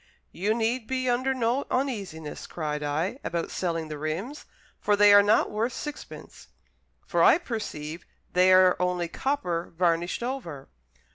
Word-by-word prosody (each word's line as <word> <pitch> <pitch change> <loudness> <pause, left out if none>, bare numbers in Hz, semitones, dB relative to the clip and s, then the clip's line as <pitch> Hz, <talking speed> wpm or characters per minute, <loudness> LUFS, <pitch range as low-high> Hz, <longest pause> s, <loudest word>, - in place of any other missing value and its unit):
"You 205 +5 -1
need 230 0 -1
be 260 -1 -2
under 255 +2 +1
no 255 +1 0
uneasiness," 200 - -3
cried 150 -3 -4
I, 160 - -2
"about 170 -1 -3
selling 165 -3 -2
the 150 -1 -7
rims; 180 - -4 0.3
for 205 - +2
they 205 0 +7
are 205 - +9
not 205 +2 +3
worth 225 +3 -1
sixpence, 295 -1 -8 0.6
for - - 0
I - - +7
perceive 195 - -6 0.3
they 185 +1 +5
are 185 0 +6
only 180 -1 0
copper 180 -6 -2
varnished 175 +3 0
over." 200 - -5
195 Hz, 145 wpm, -26 LUFS, 165-245 Hz, 0.6 s, are